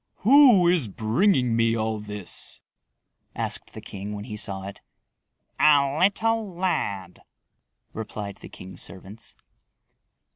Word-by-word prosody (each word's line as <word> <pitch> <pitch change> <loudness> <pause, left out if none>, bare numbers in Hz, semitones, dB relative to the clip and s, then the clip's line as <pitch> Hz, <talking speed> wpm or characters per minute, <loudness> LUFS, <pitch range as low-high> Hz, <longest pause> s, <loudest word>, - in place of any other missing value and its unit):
"Who 250 -8 +7
is 170 -8 +2
bringing 120 - +1
me 115 0 +2
all 110 0 -2
this?" 105 -2 -6 0.8
asked - - -4
the - - -7
king 100 +2 -7
when 100 - -6
he 110 -3 -7
saw 95 -2 -1
it. 100 - -9 0.8
"A 140 -2 +4
little 215 0 +1
lad," 100 - -2 0.7
replied 105 -2 -6
the - - -12
king's 95 0 -9
servants. 100 +4 -10
115 Hz, 115 wpm, -25 LUFS, -, 0.8 s, Who